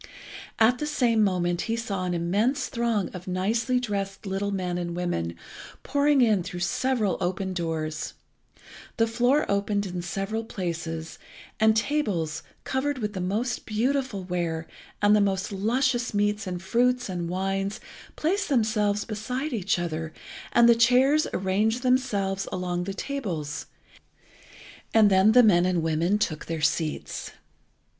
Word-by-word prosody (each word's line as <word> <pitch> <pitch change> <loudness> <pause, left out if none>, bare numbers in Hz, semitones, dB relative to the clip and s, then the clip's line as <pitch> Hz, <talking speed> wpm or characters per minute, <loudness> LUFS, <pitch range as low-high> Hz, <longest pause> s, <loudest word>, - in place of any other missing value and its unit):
At 235 +3 +4
the 300 - -2
same 240 -7 +2
moment 175 -3 +1
he 225 - +1
saw 200 -6 -3
an 180 -1 -1
immense 210 +11 0
throng 230 -5 0
of 180 0 -9
nicely 225 +7 +1
dressed 200 -4 -3
little 195 +1 -2
men 180 -3 -2
and 170 -1 -4
women 85 - -2 0.5
pouring 285 0 +3
in 215 -5 +3
through 175 +1 -6
several 215 +1 0
open 185 +1 -1
doors. 160 -3 -3 0.8
The 225 - +4
floor 245 +6 +2
opened 200 0 0
in 180 -2 -4
several 195 +6 -3
places, 165 -5 -5 0.4
and 220 0 +4
tables, 195 - -1 0.2
covered 270 +2 -1
with 210 -4 -3
the 185 - -4
most 220 +7 -2
beautiful 245 -1 0
ware, 170 -3 -2 0.4
and 205 +1 +6
the 210 - +4
most 195 0 0
luscious 240 +4 0
meats 205 0 0
and 180 0 -4
fruits 245 +5 +2
and 175 -3 -3
wines, 195 +2 -2 0.4
placed 370 +5 0
themselves 215 -5 +1
beside 250 +7 -3
each 200 -4 0
other, 160 -2 -3 0.4
and 235 0 +6
the 235 - +8
chairs 255 +6 +4
arranged 210 +6 0
themselves 205 -7 +1
along 180 -1 -2
the 195 0 -4
tables, 175 - -4 1.3
and 215 -2 +6
then 190 +3 +5
the 250 +1 +8
men 180 -5 +5
and 175 -3 +1
women 165 +5 +1
took 160 -7 -2
their 165 -1 -3
seats. 155 0 -1
200 Hz, 145 wpm, -26 LUFS, 180-235 Hz, 1.3 s, the